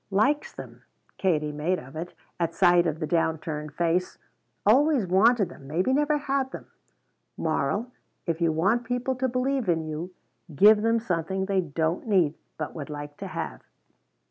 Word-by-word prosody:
"Likes 275 +10 +1
them," - - -11 0.4
Katie 155 -6 +1
made 155 +5 -1
of 135 +1 -11
it, 165 +3 -6 0.2
at 165 -1 -1
sight 175 -2 +5
of 160 0 -2
the 160 - -1
down 160 0 +1
turned 150 -1 -6
face; 175 +2 0 0.5
"always 265 +2 +4
wanted 200 +3 +4
them 135 -3 -13
maybe 180 - +1
never 295 +2 +2
had 275 -2 -1
them. - - -8 0.7
Moral 165 - -1 0.3
If 165 -1 -2
you 165 -1 +3
want 195 +10 +1
people 245 +2 -1
to 260 0 0
believe 255 -2 0
in 165 -2 +2
you, 155 +4 -5 0.4
give 210 +7 +7
them 230 +1 +2
something 190 -2 -2
they 195 -1 +1
don't 160 +4 -2
need, 180 -8 +3 0.2
but 155 - -4
would 150 -3 -7
like 145 0 -7
to - - -6
have." - - -5
180 Hz, 170 wpm, -26 LUFS, 160-230 Hz, 0.7 s, give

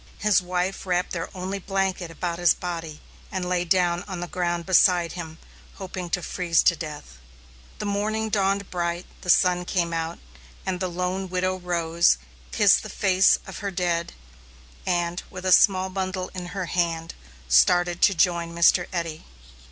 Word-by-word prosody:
His 210 -2 +3
wife 180 +2 -2
wrapped 180 0 0
their 170 -2 -4
only 190 +2 -3
blanket 190 -2 -2
about 170 +1 -4
his 175 -2 +4
body, 165 -3 -6 0.3
and 185 -1 -3
lay 180 -1 0
down 175 0 +1
on 185 -3 -5
the 175 - -3
ground 175 -1 -2
beside 175 -2 +4
him, 165 -2 -7 0.4
hoping 185 -2 -6
to 175 +1 -1
freeze 170 -1 +1
to 170 - +4
death. 150 - -8 0.6
The - - -5
morning 215 +2 -1
dawned 200 -1 0
bright, 175 0 -2 0.2
the 180 - -8
sun 180 0 +4
came 170 -1 -1
out, 165 0 -3 0.5
and 185 -1 -2
the 185 - -1
lone 180 +2 -3
widow 185 +1 0
rose, 170 - +2 0.3
kissed - - +5
the - - -8
face 190 0 +3
of - - -8
her 200 - -3
dead, 175 -2 -1 0.7
and, 175 0 0
with 185 - -8
a 185 - +2
small 185 +1 +5
bundle 185 -1 -3
in 180 -1 -6
her 190 +1 -4
hand, 165 -2 -1 0.3
started 175 - +4
to 195 - +5
join 170 -1 +1
Mr. 170 +1 +4
Eddy. 165 -3 -4
180 Hz, 165 wpm, -24 LUFS, 170-185 Hz, 0.7 s, kissed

